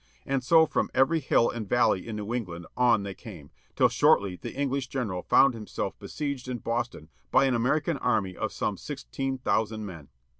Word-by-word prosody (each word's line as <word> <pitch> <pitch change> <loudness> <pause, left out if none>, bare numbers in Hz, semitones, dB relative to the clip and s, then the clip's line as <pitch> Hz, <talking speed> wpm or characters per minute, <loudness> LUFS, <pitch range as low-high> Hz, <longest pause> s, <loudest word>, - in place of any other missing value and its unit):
And 135 -2 -1
so 160 +4 +6
from - - -1
every 150 +5 +3
hill 125 -4 +3
and 110 -4 -6
valley 120 -6 +2
in 110 - -4
New 105 +2 -4
England 90 -8 -4
on 120 -4 +3
they 100 -1 -5
came, 90 - -12 0.2
till - - +5
shortly 100 -2 +3
the 90 - -8
English 140 -1 -1
general 110 -10 -3
foimd 135 +6 +5
himself 110 -2 -4
besieged 140 -4 -4
in 125 -1 -3
Boston 115 -8 -3 0.2
by - - +4
an 130 - +2
American 145 +7 +1
army 110 -8 0
of - - -3
some - - -2
sixteen 135 - -4
thousand 110 -3 -1
men. 85 -8 -9
120 Hz, 185 wpm, -27 LUFS, 100-135 Hz, 0.2 s, so